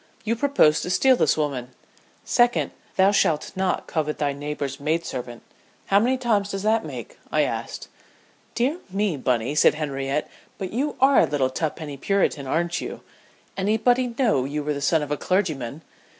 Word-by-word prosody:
You 230 +1 0
propose 255 - +3
to - - -4
steal 260 +8 +4
this - - +2
woman. 130 -5 -3 0.5
Second, 240 0 +2 0.2
thou 190 +1 +5
shalt 165 -6 +1
not 190 0 0
covet 150 -2 -2
thy 145 -1 0
neighbor's 140 -1 -4
maid 160 +4 -1
servant. 120 -2 -6 0.4
How 195 - +4
many 250 +4 +2
times 215 -5 +1
does 195 -1 -4
that 220 +1 +2
make?" - - -8
I - - +3
asked. - - -4 0.7
"Dear 270 +8 0
me, 195 -2 0
Bunny," 125 -1 0
said 150 - +4
Henriette, 140 -1 -2 0.3
"but 190 0 -5
you 280 +6 -1
are 270 +1 +6
a - - +5
little 135 -2 0
tuppenny 150 0 -4
Puritan, 155 -4 0
aren't 170 +4 0
you? - - -6 0.5
Anybody'd 235 +5 +1
know 220 - +2
you 145 +3 -3
were 150 0 -1
the 140 - -5
son 155 +2 +2
of 145 - -6
a 150 - 0
clergyman! 155 - -1
165 Hz, 170 wpm, -24 LUFS, 145-215 Hz, 0.7 s, are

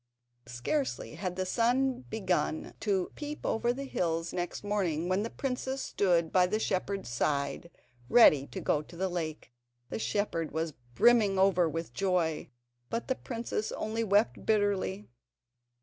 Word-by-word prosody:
Scarcely 140 - -2
had 180 +2 -4
the 185 0 -1
sun 250 +5 +1
begun 180 -7 -1
to 195 -4 0
peep 295 0 -6
over 235 +2 +1
the 270 +3 -4
hills 165 -8 -1
next 175 +2 -3
morning, 180 -6 0
when 185 +2 +1
the 225 - -2
princess 265 +1 -3
stood 170 -4 +1
by 180 -1 +4
the 210 +4 0
shepherd's 195 -1 -1
side, 140 +5 -1 0.4
ready 150 - +7
to - - -6
go 150 - +1
to 155 - -14
the 190 +1 0
lake. 160 -7 -4 0.4
The - - -3
shepherd 205 -7 -1
was 160 0 -2 0.2
brimming 215 - +5
over 185 -3 +4
with 165 +1 -5
joy, 180 -5 0 0.4
but 230 - -3
the 260 - +2
princess 230 -4 -3
only 225 +1 -2
wept 205 +1 +2
bitterly. 205 -2 +1
190 Hz, 150 wpm, -30 LUFS, 165-225 Hz, 0.4 s, ready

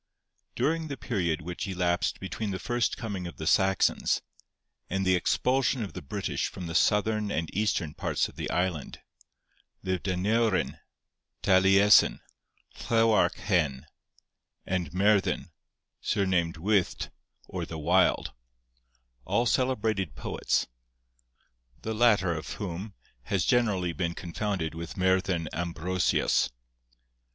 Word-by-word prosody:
During 160 +2 0
the 140 -2 -5
period 85 -11 -1
which 90 +3 -5
elapsed 90 -2 0
between 100 +3 -4
the 95 - -2
first 120 +2 -1
coming 100 -6 -4
of 85 - -10
the 80 - -5
Saxons, 95 +2 +2 0.7
and 95 +1 -1
the 95 - +4
expulsion 120 +8 +1
of 100 - -7
the - - -6
British 70 - -2
from 90 - -7
the 80 - -5
Southern 105 +3 +2
and 80 -4 -2
Eastern 100 -7 0
parts - - -1
of - - -15
the - - -4
island, 90 -5 -2 0.8
lived 95 +1 -2
Aneurin, 100 +3 +1 0.6
Taliesin, 95 +2 +5 0.7
Llewarch 115 -2 +4
Hen, 85 -8 0 0.8
and 90 -5 -2
Merddin, 100 +2 +2 0.5
surnamed 90 -5 0
Wyllt 100 +2 0 0.4
or - - -4
the 80 - -6
Wild, 75 - +2 0.9
all 120 - +1
celebrated 110 - 0
poets, - - -1 1.2
the 110 - -2
latter 105 -6 +3
of 80 -1 -5
whom 100 +1 -6 0.3
has 95 -4 0
generally 100 -8 +2
been 85 +2 -2
confounded 90 -2 -3
with 85 0 -7
Merddin 95 -2 +1
Ambrosius. 90 +2 +1
95 Hz, 115 wpm, -28 LUFS, 85-105 Hz, 1.2 s, Taliesin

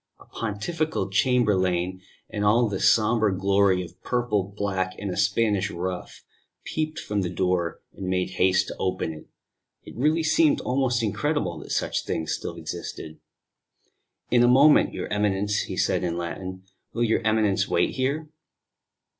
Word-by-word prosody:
A - - -16
Pontifical 115 - -3
chamberlain, 95 -5 +1 0.3
in 105 - -4
all 115 +3 +4
the 100 -3 -3
sombre 110 -3 +3
glory 95 -1 +3
of 85 0 -13
purple, 120 -5 0
black, 95 -2 -1
and 100 -2 -4
a - - -4
Spanish 105 -4 +1
ruff, 90 0 -5 0.4
peeped 155 0 -3
from 105 -1 -2
the 90 - -2
door, 90 -2 -1
and 95 - -6
made 90 0 0
haste 95 0 +2
to - - -7
open 95 -3 -1
it. 75 - -12 0.6
It - - -12
really 155 +6 +2
seemed 295 - +3
almost 125 -2 0
incredible 110 - -1
that - - -11
such - - -1
things 80 -1 -2
still - - -5
existed. 80 0 -7 1.1
"In 120 0 +5
a 120 - +5
moment, 140 +4 +6
your - - -4
Eminence," 105 0 +1
he - - -5
said - - +1
in 85 -1 -1
Latin. 95 +2 -5 0.3
"Will 120 - 0
your 115 0 +2
Eminence 110 -3 +2
wait - - +1
here?" 140 +4 -1
100 Hz, 155 wpm, -25 LUFS, 95-120 Hz, 1.1 s, moment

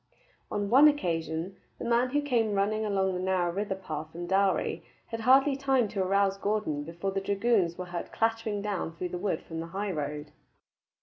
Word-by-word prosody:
On 205 0 -2
one 275 +5 +8
occasion, 170 - -1 0.2
the - - -6
man 235 +2 +2
who 290 +3 0
came 230 -7 +1
running 210 +2 +1
along 195 -2 +1
the 180 - -2
narrow 180 -2 0
river 200 0 -2
path 155 -4 -6
from 175 +1 -6
Dalry 190 +1 +1 0.2
had 230 - -5
hardly 270 +4 +5
time 270 -4 +2
to 195 -1 -2
arouse 195 +1 +2
Gordon 200 -9 -1
before 170 +5 -4
the 195 0 -2
dragoons 200 -3 +1
were 180 - -4
heard 175 -1 -6
clattering 225 -2 -1
down 195 -5 -3
through 180 +2 -4
the 180 - -4
wood 185 -4 -1
from 165 -1 -6
the 165 - -5
high 205 0 -1
road. 150 -2 -4
195 Hz, 190 wpm, -29 LUFS, 175-225 Hz, 0.2 s, one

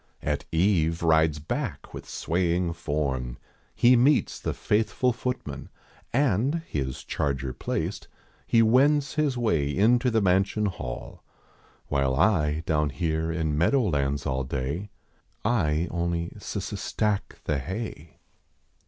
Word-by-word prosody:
At - - -1
eve 85 -2 +2
rides 80 -2 +3
hack - - -4
with - - -8
swaying 85 0 0
form; 70 -6 -2 0.4
he 125 +1 +6
meets 135 +5 +3
The - - -2
faithful 115 +4 +1
footman 125 +2 -4 0.4
and, 135 - +1
his 65 -3 -3
charger 70 -2 -2
placed, - - -3 0.4
lie 115 - +6
wends 140 +5 +4
his 150 -4 +1
way 85 -12 +1
into 120 - +3
the 115 -2 +2
mansion 100 +2 +2
hall. 60 -11 -5 0.7
While 70 -2 +1
I, 80 -3 +2
down 75 -2 +1
here 80 +1 -1
in 80 -2 -1
meadow 105 - +3
lands 70 -2 0
all 65 0 -1
day, 70 +9 -3 0.6
I 85 -8 +1
only 85 0 -2
s - - -7
s - - -4
stack 105 -2 -1
the 75 -2 0
hay. 85 - -6
85 Hz, 125 wpm, -26 LUFS, 75-110 Hz, 0.7 s, he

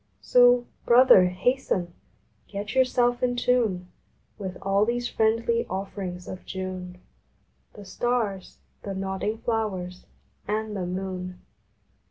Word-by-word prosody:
So, 245 0 +5 0.2
Brother, 240 -6 +7
hasten! 180 -2 -1 0.5
Get 200 0 -5
yourself 250 -1 +2
in 245 -1 +1
tune 235 -7 +1 0.5
With 190 -2 -5
all 195 +1 +3
these 240 +2 0
friendly 230 +1 +1
offerings 190 -1 -5
of 185 - -7
June 185 -1 -6 0.8
The 205 - -11
Stars, 205 -1 -2 0.2
the 195 -1 -5
nodding 190 +3 -2
Flowers, 205 -6 -3 0.4
and 215 +1 -2
the 185 -3 -3
Moon. 185 0 -5
200 Hz, 110 wpm, -26 LUFS, 185-240 Hz, 0.8 s, Brother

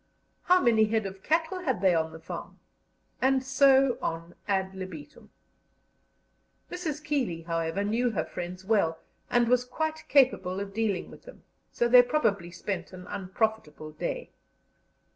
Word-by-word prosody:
How 365 +1 +5
many 225 -7 +4
head 220 0 0
of 190 0 -7
cattle 325 - 0
had 265 - -1
they 185 -1 +4
on 160 -1 0
the 160 - -9
farm? 160 - -8 0.6
And 265 0 +3
so 270 -1 +4
on 165 +1 -4
ad 190 -1 0
libitum. 185 -6 -9 1.4
Mrs. 315 -4 -4
Keeley, 255 - -1
however, 165 +3 -1
knew 230 +4 +1
her 180 -9 -2
friends 180 +1 -7
well, 190 -7 +2 0.3
and 240 -1 +3
was 250 +1 +3
quite 315 +5 -3
capable 250 -9 +3
of 200 0 -6
dealing 210 -4 -1
with - - -14
them, - - -14 0.3
so 240 - +1
they 245 +1 +9
probably 215 - 0
spent 175 0 -5
an 180 0 -10
unprofitable 195 -5 -3
day. - - -5
215 Hz, 145 wpm, -28 LUFS, 180-265 Hz, 1.4 s, they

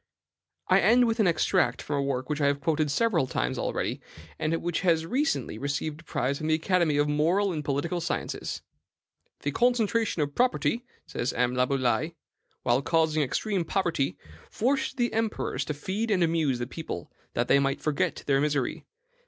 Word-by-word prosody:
I - - +5
end 245 +2 +5
with 225 0 0
an 210 - +4
extract 175 +1 +2
from 145 - -3
a - - +1
work 130 -2 -2
which 150 0 -2
I 140 - +4
have 140 0 +1
quoted 155 +1 +1
several 165 - +2
times - - -1
already, - - -2 0.4
and 155 - 0
which 175 -1 -1
has 165 -3 +2
recently 165 - -1
received 145 +3 -3
a - - -21
prize 140 -2 -1
from 155 - -3
the 155 - +4
Academy 165 -2 +1
of 145 0 +3
Moral 170 +7 +2
and 150 -2 -3
Political 150 +5 -1
Sciences: - - -3 0.8
"The 145 - -1
concentration 230 - +2
of 145 0 -4
property," 245 - +1 0.2
says 120 - -3
M. 125 0 +1
Laboulaye, 130 +4 +1 0.5
"while 120 +3 +2
causing 160 0 +2
extreme 185 - 0
poverty, 165 - 0 0.3
forced 265 +4 0
the 240 -2 0
emperors 225 -1 -1
to 150 - -3
feed 195 +10 -3
and 190 -4 +3
amuse 160 -6 +1
the 120 - -3
people, 130 - -6 0.2
that - - +1
they 140 - +5
might 135 0 0
forget 150 -2 0
their 135 -1 +3
misery. 145 -4 -1
155 Hz, 175 wpm, -27 LUFS, 140-190 Hz, 0.8 s, I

